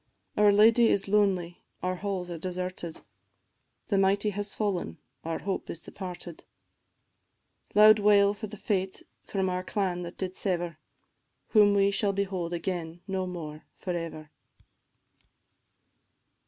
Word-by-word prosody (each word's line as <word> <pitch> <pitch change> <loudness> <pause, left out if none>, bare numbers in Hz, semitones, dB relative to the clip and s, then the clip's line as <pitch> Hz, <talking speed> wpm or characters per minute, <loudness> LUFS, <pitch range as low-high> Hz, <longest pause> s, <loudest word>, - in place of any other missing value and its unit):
Our 210 0 +5
lady 225 +3 +6
is 200 -2 +2
lonely, 195 -4 +1 0.2
our 185 0 -1
halls 185 -2 -3
are 170 - -5
deserted 180 -1 -5 0.9
The 200 -3 +3
mighty 200 +2 +3
is 205 +1 -3
fallen, 190 - -2 0.3
our 165 0 -2
hope 195 -1 -4
is 165 - -6
departed 180 -3 -8 1.3
Loud 215 +1 +8
wail 205 -1 +5
for 215 +1 -6
the 210 +1 -9
fate 190 -2 -2 0.2
from 190 -2 -2
our 180 0 -1
clan 185 -3 -1
that 175 0 -7
did 185 -1 -4
sever, 175 -4 -2 0.7
Whom 205 -2 +5
we 200 0 +4
shall 200 0 +1
behold 190 -3 -2
again 170 -1 -4
no 190 -1 -2
more 155 -4 -7
for 180 - -4
ever. 155 -3 -6
190 Hz, 130 wpm, -28 LUFS, 175-205 Hz, 1.3 s, Loud